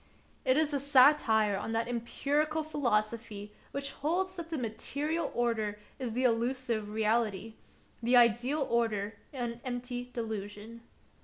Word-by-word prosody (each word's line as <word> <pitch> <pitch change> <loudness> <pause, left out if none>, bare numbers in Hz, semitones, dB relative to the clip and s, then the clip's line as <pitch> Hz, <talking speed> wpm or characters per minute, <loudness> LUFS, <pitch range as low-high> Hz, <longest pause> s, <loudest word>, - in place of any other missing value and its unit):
It 260 +2 +4
is 310 -1 +2
a 280 - +1
satire 255 -7 +5
on 215 +3 -3
that 225 +1 0
empirical 290 +6 0
philosophy 225 -7 -1 0.2
which 280 0 -4
holds 365 +7 -1
that 335 -2 -6
the 325 - -2
material 285 +7 -2
order 225 -3 0 0.2
is 245 -4 -3
the 250 +3 0
elusive 235 -2 0
reality, 220 -1 0 0.5
the 245 +2 +4
ideal 245 +5 +3
order 220 -3 0
an 240 -4 -4
empty 245 0 -4
delusion. 220 -1 -5
240 Hz, 130 wpm, -31 LUFS, 220-280 Hz, 0.5 s, satire